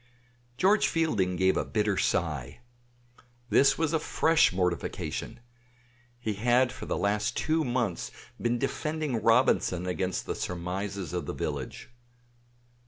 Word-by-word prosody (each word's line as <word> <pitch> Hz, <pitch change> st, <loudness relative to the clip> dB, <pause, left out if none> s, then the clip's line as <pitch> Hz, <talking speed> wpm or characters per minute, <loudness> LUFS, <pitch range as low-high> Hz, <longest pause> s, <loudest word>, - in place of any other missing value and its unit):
George 200 Hz, +7 st, +4 dB
Fielding 110 Hz, -, +1 dB
gave 95 Hz, +1 st, +3 dB
a -, -, +1 dB
bitter 105 Hz, -2 st, 0 dB
sigh. 75 Hz, -, -1 dB, 0.9 s
This 140 Hz, -, +5 dB
was 160 Hz, -1 st, 0 dB
a 160 Hz, -, +3 dB
fresh 160 Hz, +1 st, +3 dB
mortification. 90 Hz, +5 st, -2 dB, 0.8 s
He 110 Hz, -3 st, -2 dB
had 120 Hz, +4 st, +3 dB
for -, -, -8 dB
the -, -, -1 dB
last 105 Hz, +4 st, 0 dB
two 160 Hz, +1 st, +1 dB
months 120 Hz, -, -1 dB, 0.3 s
been 120 Hz, 0 st, +1 dB
defending 145 Hz, -1 st, -2 dB
Robinson 115 Hz, -6 st, +3 dB
against 90 Hz, +1 st, -2 dB
the -, -, -2 dB
surmises 90 Hz, 0 st, -4 dB
of -, -, -3 dB
the -, -, -4 dB
village. 70 Hz, -, -5 dB
105 Hz, 125 wpm, -28 LUFS, 90-130 Hz, 0.9 s, This